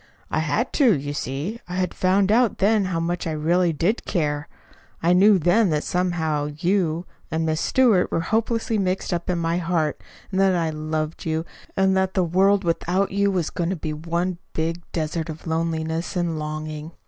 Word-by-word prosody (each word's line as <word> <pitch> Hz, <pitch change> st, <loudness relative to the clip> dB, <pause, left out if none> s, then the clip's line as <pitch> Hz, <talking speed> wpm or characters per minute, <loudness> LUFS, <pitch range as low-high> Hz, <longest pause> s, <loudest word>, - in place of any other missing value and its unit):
"I -, -, +1 dB
had -, -, -1 dB
to, 245 Hz, -, +4 dB
you 145 Hz, +1 st, -4 dB
see. 145 Hz, -, -4 dB
I 180 Hz, -, -4 dB
had 185 Hz, 0 st, -1 dB
found 190 Hz, +2 st, +2 dB
out 235 Hz, 0 st, +3 dB
then 205 Hz, 0 st, +3 dB
how 180 Hz, -3 st, -1 dB
much 170 Hz, +1 st, -2 dB
I 160 Hz, -, -2 dB
really 170 Hz, +3 st, +2 dB
did 175 Hz, +9 st, 0 dB
care. 150 Hz, -4 st, -1 dB, 0.6 s
I 175 Hz, +1 st, +4 dB
knew 200 Hz, +3 st, +6 dB
then 185 Hz, +5 st, +3 dB
that 150 Hz, -1 st, 0 dB
somehow 165 Hz, -5 st, 0 dB
you 175 Hz, -1 st, 0 dB, 0.2 s
and 160 Hz, 0 st, -1 dB
Miss 155 Hz, 0 st, 0 dB
Stewart 230 Hz, -9 st, +3 dB
were 165 Hz, -, +1 dB
hopelessly 225 Hz, +3 st, 0 dB
mixed 185 Hz, -1 st, -1 dB
up 175 Hz, +1 st, -3 dB
in 180 Hz, -, +1 dB
my 165 Hz, 0 st, 0 dB
heart, 165 Hz, -4 st, -1 dB, 0.3 s
and 190 Hz, -, 0 dB
that 190 Hz, -1 st, +4 dB
I 165 Hz, -2 st, 0 dB
loved 155 Hz, +1 st, -3 dB
you, 160 Hz, +1 st, -1 dB, 0.3 s
and 190 Hz, 0 st, +3 dB
that 190 Hz, +1 st, 0 dB
the 185 Hz, -, +3 dB
world 190 Hz, +4 st, +3 dB
without 180 Hz, +3 st, 0 dB
you 200 Hz, +1 st, +2 dB
was 180 Hz, -5 st, -1 dB
going 170 Hz, -1 st, -2 dB
to 190 Hz, -, -1 dB
be 155 Hz, -2 st, -4 dB
one 170 Hz, +3 st, -2 dB
big 165 Hz, +2 st, -2 dB
desert 160 Hz, 0 st, -2 dB
of 155 Hz, 0 st, -8 dB
loneliness 160 Hz, +1 st, -2 dB
and 170 Hz, -3 st, -1 dB
longing. 155 Hz, +1 st, -5 dB
170 Hz, 190 wpm, -23 LUFS, 160-190 Hz, 0.6 s, knew